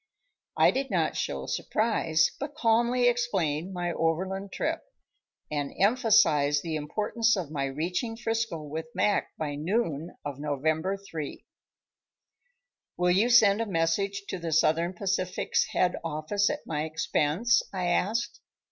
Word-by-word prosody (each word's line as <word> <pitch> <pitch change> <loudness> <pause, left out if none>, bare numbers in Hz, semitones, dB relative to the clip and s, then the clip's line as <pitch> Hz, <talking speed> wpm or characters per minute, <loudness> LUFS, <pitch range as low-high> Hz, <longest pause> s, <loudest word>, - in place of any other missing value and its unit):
I - - +6
did 270 +1 -2
not - - 0
show - - -3
surprise, 170 -8 +1
but 290 +1 -5
calmly 240 -1 +3
explained 190 -9 0
my 175 -1 -2
overland 190 +4 -1
trip, 325 - -2 0.7
and 145 -2 -2
emphasized 195 - +4
the 165 -2 -3
importance 215 +9 0
of 170 -6 -4
my 140 -3 -1
reaching 175 - -3
'Frisco 225 -8 -2
with 160 +2 -5
Mac 205 - +2
by 150 -2 -3
noon 165 0 -2
of 145 -2 -5
November 155 +6 -1
3. 165 -7 -7 1.5
"Will 180 0 +2
you 205 +7 +3
send 220 -3 +6
a 230 - -2
message 195 +3 0
to 185 - -3
the 165 -1 -4
Southern 165 +3 +2
Pacific's 185 -1 0
head 180 -1 +1
office 165 +6 0
at 295 - -4
my 150 -2 -2
expense?" 160 +8 +1
I 185 -2 -2
asked. 225 - 0
180 Hz, 135 wpm, -28 LUFS, 155-225 Hz, 1.5 s, I